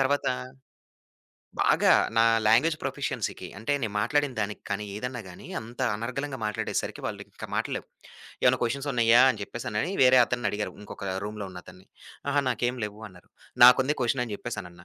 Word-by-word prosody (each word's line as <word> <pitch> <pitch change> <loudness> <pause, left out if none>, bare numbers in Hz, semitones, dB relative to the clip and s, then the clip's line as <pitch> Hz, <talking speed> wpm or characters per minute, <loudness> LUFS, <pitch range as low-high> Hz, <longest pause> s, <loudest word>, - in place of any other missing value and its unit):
తర్వాత 140 +1 +1 1.3
బాగా - - +4 0.2
నా 115 - +6 0.2
లాంగ్వేజ్ 140 +9 +4
ప్రొఫిషియన్సీకి. - - -3
అంటే 115 +6 -1
నేను 110 - -2
మాట్లాడిన 145 +5 +1
దానికి 105 0 -3
కానీ, 105 +1 -2
ఏదన్నా 125 +2 -4
గాని 90 - -12
అంత 120 +3 -11 0.2
అనర్గళంగా 135 +4 -4
మాట్లాడేసరికి 105 - -3
వాళ్ళు - - -5
ఇంక - - -10
మాటలు - - -1
లేవు. - - -7 0.6
"ఏమన్నా - - +4
క్వెషన్సున్నాయా" 120 -2 +3
అని 110 -5 -5
చెప్పేసెనని 110 - -3
వేరే 130 0 +7
అతన్ని 120 -3 -2
అడిగారు. 105 +1 -3
ఇంకొక 105 - -9 0.2
రూమ్‌లో 105 -1 -5
ఉన్న 90 -1 -9
అతన్ని. 95 +1 -15 0.4
"అహా! 145 +1 +3
నాకేం 125 +1 -1
లేవు" 105 +1 -7
అన్నారు. 90 -1 -18 0.4
నాకుంది 130 +4 +6
క్వెషన్ 125 +1 +1
అని 105 -3 -5
చెప్పేసనన్నా. 90 -7 -7
115 Hz, 155 wpm, -27 LUFS, 105-130 Hz, 1.3 s, వేరే